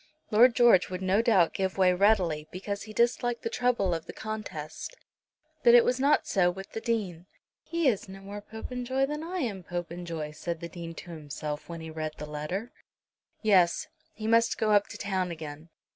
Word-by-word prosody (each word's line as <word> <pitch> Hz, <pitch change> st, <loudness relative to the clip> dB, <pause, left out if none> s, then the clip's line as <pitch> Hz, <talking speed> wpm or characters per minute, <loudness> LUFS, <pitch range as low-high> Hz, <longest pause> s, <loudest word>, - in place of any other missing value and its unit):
Lord 235 Hz, +3 st, +6 dB
George 235 Hz, -7 st, +5 dB
would 185 Hz, 0 st, -4 dB
no 190 Hz, +3 st, +3 dB
doubt 195 Hz, -8 st, +4 dB
give 190 Hz, 0 st, -2 dB
way 185 Hz, -1 st, +5 dB
readily, 180 Hz, -6 st, +2 dB
because 200 Hz, +2 st, -4 dB
he 215 Hz, -, -8 dB
disliked 240 Hz, +1 st, +1 dB
the 230 Hz, -, -2 dB
trouble 235 Hz, -8 st, +1 dB
of 165 Hz, 0 st, -4 dB
the -, -, -7 dB
contest. 215 Hz, -, -6 dB, 0.6 s
But 235 Hz, 0 st, +7 dB
it 240 Hz, -, +7 dB
was 250 Hz, +1 st, +1 dB
not 285 Hz, +3 st, +3 dB
so 180 Hz, -2 st, +3 dB
with 195 Hz, +2 st, -7 dB
the 225 Hz, -, -5 dB
Dean. 190 Hz, -7 st, -2 dB, 0.3 s
"He 335 Hz, -3 st, 0 dB
is 210 Hz, -6 st, +1 dB
no 195 Hz, 0 st, -9 dB
more 200 Hz, +1 st, -7 dB
Popenjoy 250 Hz, +5 st, -2 dB
than 300 Hz, +2 st, -4 dB
I 355 Hz, +2 st, -3 dB
am 210 Hz, -8 st, -3 dB
Popenjoy," 170 Hz, -3 st, -5 dB
said 165 Hz, +2 st, -4 dB
the 170 Hz, -, -6 dB
Dean 165 Hz, -1 st, -8 dB
to 175 Hz, -, -9 dB
himself 150 Hz, -1 st, -6 dB
when 165 Hz, -1 st, -6 dB
he 160 Hz, 0 st, -7 dB
read 155 Hz, -1 st, -4 dB
the 150 Hz, -, -6 dB
letter. 150 Hz, +10 st, -4 dB, 0.7 s
Yes; 185 Hz, -5 st, +3 dB, 0.3 s
he 215 Hz, -, -6 dB
must 230 Hz, +1 st, +3 dB
go 215 Hz, -1 st, +1 dB
up 205 Hz, -1 st, +4 dB
to -, -, -9 dB
town 190 Hz, -2 st, -1 dB
again. 155 Hz, -1 st, -8 dB
190 Hz, 190 wpm, -28 LUFS, 170-230 Hz, 0.7 s, But